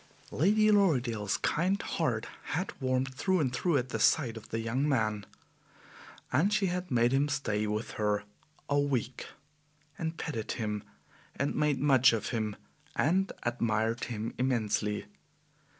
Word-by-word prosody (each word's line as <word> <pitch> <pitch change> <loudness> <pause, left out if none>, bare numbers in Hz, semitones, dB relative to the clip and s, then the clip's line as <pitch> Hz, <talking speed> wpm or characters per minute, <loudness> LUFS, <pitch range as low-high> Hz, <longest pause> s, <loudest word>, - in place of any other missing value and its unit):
Lady 215 +7 +4
Lorridaile's 125 - +2
kind 185 +5 +1
heart 120 -9 -1 0.3
had 180 +4 -2
warmed 130 0 0
through 185 +8 +1
and 130 -5 0
through 165 +4 +1
at 130 -1 -2
the - - -3
sight 125 -8 +3
of 110 - -10
the 115 - -2
young 125 +6 0
man, 110 -6 0 1.1
and 165 +10 +3
she 210 -1 +2
had 180 0 -2
made 120 -1 +3
him 140 +2 +2
stay 110 -7 -1
with 105 +2 -2
her 105 -1 +1 0.4
a 145 0 +2
week, 130 -4 -1 0.7
and 160 0 -3
petted 115 -9 -3
him, 105 -3 -2 0.5
and 140 +2 -1
made 150 -3 +1
much 135 -4 +5
of 110 -2 -2
him 110 -3 -2 0.4
and 190 +6 +2
admired 115 -1 0
him 115 -1 -4
immensely. 110 -5 0
130 Hz, 145 wpm, -30 LUFS, 110-155 Hz, 1.1 s, much